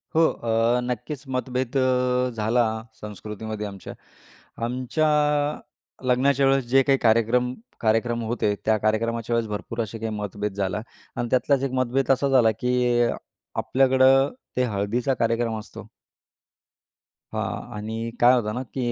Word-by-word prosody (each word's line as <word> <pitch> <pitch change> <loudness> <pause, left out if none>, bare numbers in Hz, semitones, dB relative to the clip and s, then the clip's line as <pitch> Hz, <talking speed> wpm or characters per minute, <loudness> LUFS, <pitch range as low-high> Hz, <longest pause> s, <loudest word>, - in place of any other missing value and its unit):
हो, 165 - +5
अ, 115 +1 +1
नक्कीच 125 +4 -4
मतभेद 130 0 -2
अ, 125 -1 +2
झाला 115 +3 +2 0.4
संस्कृतीमध्ये 105 +1 -6
आमच्या. 100 -1 -9 0.7
आमच्या 130 +6 0 1.0
लग्नाच्या 135 +2 +3
वेळेस 135 -1 +2
जे 135 +2 +5
काही 135 0 +3
कार्यक्रम 120 +2 +2 0.3
कार्यक्रम 115 +1 +1
होते, 110 -2 0
त्या 110 0 +3
कार्यक्रमाच्या 115 +2 0
वेळेस 115 -2 -1
भरपूर 115 +3 -4
असे 110 +1 -5
काही 115 0 -3
मतभेद 105 0 -4
झाला 95 +1 -2 0.3
आणि 120 - -2
त्यातलाच 130 +2 +2
एक 135 - -1
मतभेद 130 +2 +1
असा 135 +1 +2
झाला 125 -4 +5
की 125 -1 +2
अ, 120 - +1 0.4
आपल्याकडं 135 +1 +4 0.3
ते 125 - +3
हळदीचा 115 +4 0
कार्यक्रम 115 -1 0
असतो. 105 - -11 1.5
हां, 120 - -4
आणि 110 +2 -5 0.2
काय 120 +1 +7
होतं 105 -3 -1
ना 125 - -3
की 125 -3 -1
120 Hz, 135 wpm, -24 LUFS, 110-130 Hz, 1.5 s, काय